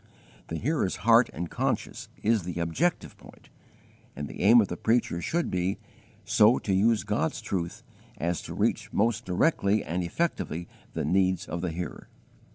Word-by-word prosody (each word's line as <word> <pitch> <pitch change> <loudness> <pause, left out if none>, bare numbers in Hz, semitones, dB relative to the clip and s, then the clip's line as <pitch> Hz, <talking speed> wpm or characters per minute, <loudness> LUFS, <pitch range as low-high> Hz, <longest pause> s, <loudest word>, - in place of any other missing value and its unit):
The 80 - -4
hearer's 135 - 0
heart 115 +1 +6
and 85 +2 -4
conscience - - -3
is 110 0 +3
the 90 0 -5
objective 115 - -1
point, - - -17 0.7
and 75 +1 -5
the - - -8
aim 115 +4 +7
of 105 - +3
the 90 - -4
preacher 110 -5 +1
should 170 - -1
be, 90 +1 0 0.5
so 110 +4 +5
to 100 - -2
use 110 +3 +3
God's 110 +9 -1
truth 95 -6 -4 0.3
as 85 +1 -1
to - - -8
reach - - 0
most 110 +1 +1
directly 100 - +2
and 85 +4 -2
effectively 85 - -2 0.3
the - - -2
needs 95 -1 +2
of 85 +1 -4
the 90 - -1
hearer. 85 +2 -6
95 Hz, 165 wpm, -27 LUFS, 85-115 Hz, 0.7 s, aim